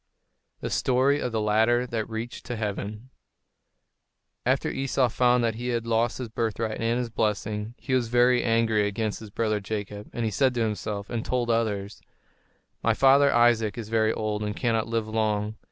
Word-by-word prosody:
THE - - -4
STORY 135 +3 +2
OF 125 - -2
THE 110 - -1
LADDER 110 +3 +2
THAT 115 -3 -3
REACHED 115 +2 -5
TO 125 - -3
HEAVEN 105 +2 -5 1.4
After - - +1
Esau 135 -1 +1
found 125 +1 +3
that 115 -1 +1
he 120 +3 -5
had 120 -2 -1
lost 115 0 +1
his 125 - -4
birthright 110 0 -2
and 115 +1 +1
his 120 -2 -3
blessing, 105 0 -2
he 130 - -4
was 125 -2 +2
very 120 +1 +4
angry 115 -2 +2
against 105 +1 -2
his 110 - -10
brother 110 0 0
Jacob; 105 0 -5
and 120 - -2
he 110 - -1
said 130 +3 +2
to 120 - 0
himself, 105 -1 -2
and 115 -2 -2
told 120 +1 0
others: 105 -3 -1 0.8
"My 115 -1 +2
father 140 +2 +5
Isaac 120 -3 +3
is 110 -2 -6
very 110 -1 +2
old 110 -1 -2
and 105 0 -3
cannot 115 -3 0
live 115 -1 -1
long. 110 -1 0
115 Hz, 180 wpm, -26 LUFS, 105-120 Hz, 1.4 s, father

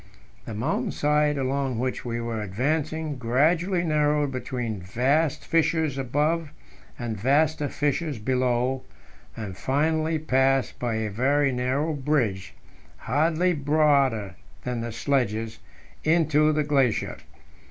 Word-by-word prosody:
The 110 - -6
mountain 130 +10 -1
side 150 0 +1
along 135 -2 -1
which 130 +2 -2
we 120 -1 -3
were 115 -2 -3
advancing 150 +8 -2
gradually 165 +9 +2
narrowed 150 -3 +1
between 125 -5 -4
vast 135 - 0
fissures 160 -3 +1
above 150 +5 0 0.5
and 120 -5 -3
vaster 145 +3 +2
fissures 145 0 -1
below, 125 +2 0 0.6
and 105 -5 -5
finally 155 - 0
passed 135 -4 +1
by 120 -2 -1
a 110 -1 -2
very 140 +6 +2
narrow 130 +5 0
bridge 130 -10 -1 0.4
hardly 160 - +1
broader 140 - +2 0.3
than 125 -2 -3
the 115 0 -4
sledges 115 -3 -1 0.4
into 155 -1 +3
the 150 0 +1
glacier. 135 -6 +1
140 Hz, 115 wpm, -25 LUFS, 120-155 Hz, 0.6 s, into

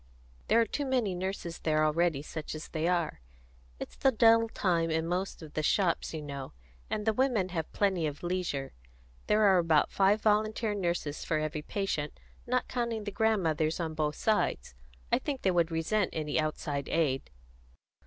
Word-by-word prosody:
"There 230 - +4
are 230 - +4
too 285 +4 -3
many 245 -7 +1
nurses 180 -2 -4
there 155 -1 +2
already, 155 -2 +1
such 155 0 -6
as 155 - -7
they 160 0 -1
are. 175 - 0 0.6
It's - - -7
the 270 - +3
dull 230 -1 +5
time 170 -6 +1
in 160 0 0
most 180 +1 -3
of 155 -1 -11
the 155 - -1
shops, 170 +2 +1
you 155 -2 -5
know, 140 -2 -6 0.4
and 210 -1 -2
the 220 - +3
women 235 -6 +1
have 165 -3 -3
plenty 190 -6 +1
of 145 +2 -7
leisure. 175 -7 -2 0.5
There 215 +1 +3
are 190 -3 +6
about 165 -3 +3
five 200 +2 +3
volunteer 215 0 +1
nurses 170 -6 -2
for 155 - 0
every 155 0 -2
patient, 155 -4 -3 0.3
not 250 +1 0
counting 235 -3 -2
the 205 - -4
grandmothers 175 -8 +1
on 160 -2 -2
both 150 -1 -1
sides. 210 - 0 0.4
I - - +4
think 275 -3 -4
they 190 - +3
would 170 -2 +2
resent 170 +5 0
any 155 -1 -1
outside 150 -2 -2
aid." 145 -5 0
175 Hz, 175 wpm, -30 LUFS, 155-210 Hz, 0.6 s, are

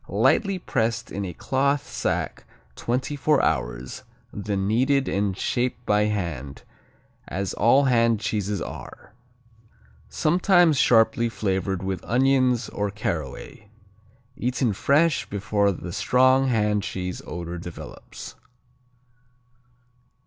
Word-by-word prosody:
Lightly 195 -2 +2
pressed 115 -8 -2
in 100 - -3
a 90 - -5
cloth 140 +1 0
sack - - -3 0.3
twenty 130 +4 -2
four 145 0 +2
hours, 60 -3 -2 0.3
then 100 -1 -2
kneaded 135 +5 +2
and 100 -1 -1
shaped 125 +2 -1
by 105 -1 +3
hand, 85 -10 -4 0.6
as 95 +1 -3
all 125 +6 +4
hand 115 -4 +3
cheeses 105 -3 -2
are. - - -10 1.0
Sometimes 175 -2 +3
sharply 115 +1 +4
flavored 95 -3 -2
with 95 -2 -3
onions 125 -1 +2
or 105 0 -2
caraway. 100 +1 -5 0.7
Eaten 125 -4 0
fresh, 145 - +2
before 100 0 +1
the 90 -1 -7
strong 130 +4 +3
hand 105 -4 +1
cheese 90 -1 -4
odor 85 0 -5
develops. 85 0 -9
110 Hz, 105 wpm, -24 LUFS, 95-130 Hz, 1.0 s, all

